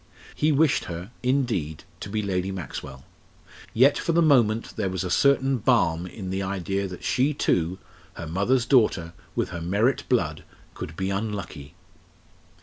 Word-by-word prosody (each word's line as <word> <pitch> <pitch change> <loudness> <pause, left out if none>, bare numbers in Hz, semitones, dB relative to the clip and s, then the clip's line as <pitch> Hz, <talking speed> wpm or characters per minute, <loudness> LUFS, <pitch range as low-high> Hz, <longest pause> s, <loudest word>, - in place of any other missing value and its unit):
He 155 +1 +1
wished 150 0 +3
her, 90 +5 -7
indeed, 120 - -1 0.2
to - - -7
be 105 +1 -2
Lady 95 -1 -1
Maxwell. 70 -7 -7 0.7
Yet 135 +5 +4
for 170 - -1
the 170 - +4
moment 115 -7 +3
there 100 -3 -1
was 95 0 -2
a 90 - -3
certain 135 +2 +3
balm 90 -8 +2
in 95 -1 -7
the 95 +1 -1
idea 95 0 -2
that 90 -5 -9
she 130 - +1
too 90 - +1 0.4
her 85 - -6
mother's 100 +10 +1
daughter 105 -11 +3 0.2
with - - 0
her 85 - -6
Merritt 100 +10 0
blood 80 -11 0 0.3
could 75 - -7
be 95 +3 -2
unlucky. 95 -7 -5
100 Hz, 155 wpm, -25 LUFS, 85-125 Hz, 0.7 s, Yet